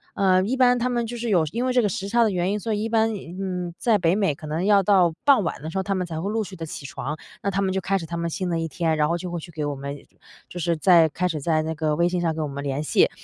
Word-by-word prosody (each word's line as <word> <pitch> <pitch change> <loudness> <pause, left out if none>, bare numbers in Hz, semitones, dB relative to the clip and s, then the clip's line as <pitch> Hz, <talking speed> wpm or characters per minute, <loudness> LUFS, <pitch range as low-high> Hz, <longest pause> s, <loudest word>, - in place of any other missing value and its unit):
呃 185 -1 +3
一 250 +7 -1
般 250 -1 +5
他 250 +1 0
们 240 -1 0
就 240 - -6
是 235 0 -3
有 175 -6 +3
因 240 +2 -1
为 255 - +1
这 250 - +4
个 210 - +2
时 200 -2 -4
差 235 +1 +4
的 215 - +2
原 180 +1 0
因， 210 - -1
所 220 +1 -2
以 210 - -1
一 225 - -2
般， 225 0 +2
嗯 180 -1 -5
在 225 -3 +3
北 170 -2 +2
美 195 -9 +1
可 155 - -10
能 160 +4 -2
要 205 -1 +5
到 180 -4 +4
傍 275 -7 +5
晚 165 - -3
的 155 - -5
时 190 - -5
候， 190 - 0
他 195 0 -1
们 180 -1 -1
才 160 -2 -5
会 200 - -2
陆 225 0 0
续 195 -2 -9
地 165 - -5
起 150 -2 -8
床， 140 +2 -4 0.3
那 200 - +1
他 195 +1 0
们 190 -1 0
就 190 - 0
开 195 +2 0
始 170 - -5
他 170 +1 -5
们 170 0 -2
新 185 +1 -3
的 165 -1 0
一 165 - -2
天， 160 -1 -1
然 150 -1 +3
后 170 - +1
就 180 0 -6
会 175 - -3
去 170 - -11
给 150 -2 -3
我 145 -1 -2
们 140 +1 -6 0.5
就 175 - -7
是 170 0 +1
在 170 -1 +6
开 180 +5 -1
始 160 -3 -3
在 155 +2 +1
那 160 +1 -3
个 155 -1 0
微 170 +2 +2
信 180 0 -1
上 165 -2 0
跟 160 - -2
我 150 - -3
们 140 0 -5
联 140 +1 -2
系。 - - +3
180 Hz, 360 characters per minute, -24 LUFS, 160-205 Hz, 0.5 s, 在